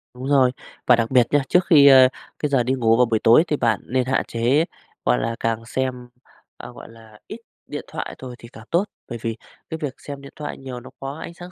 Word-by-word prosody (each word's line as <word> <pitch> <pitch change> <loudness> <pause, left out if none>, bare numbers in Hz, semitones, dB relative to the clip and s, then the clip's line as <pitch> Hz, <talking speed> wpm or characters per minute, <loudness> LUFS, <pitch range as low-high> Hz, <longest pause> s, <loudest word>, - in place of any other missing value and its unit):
Đúng 130 +2 -6
rồi, 135 -3 +4 0.4
và 125 - +7
đặc 115 0 -1
biệt 125 -3 +4
nha, 145 - +4
trước 180 0 +3
khi, 145 -6 +7
a, 130 -2 +8 0.3
cái 150 - -1
giờ 135 -3 +2
đi 130 +2 0
ngủ 115 -3 +2
vào 125 - +5
buổi 115 -2 0
tối 115 +9 +6
thì 150 - 0
bạn 115 -5 +1
nên 130 0 0
hạn 130 +1 0
chế, 125 +7 +1 0.4
gọi - - +3
là 115 - -2
càng 115 0 -2
xem, 125 0 -3 0.5
ờ, - - -10
gọi - - -12
là, 110 -2 -17
ít 220 - -8 0.3
điện 145 - -6
thoại - - -6
thôi 125 -2 -9
thì 115 - -12
càng 110 - -12
tốt. 170 +3 +3 0.3
Bởi 120 - -5
vì 115 -1 -3 0.3
cái 160 - -4
việc 145 -4 -3
xem 140 -1 -9
điện 140 - -12
thoại 150 -1 -6
nhiều 130 -2 -8
nó 120 - -12
có 135 0 -5
ánh 170 - -8
sáng 175 +1 -11
130 Hz, 245 wpm, -22 LUFS, 115-140 Hz, 0.5 s, a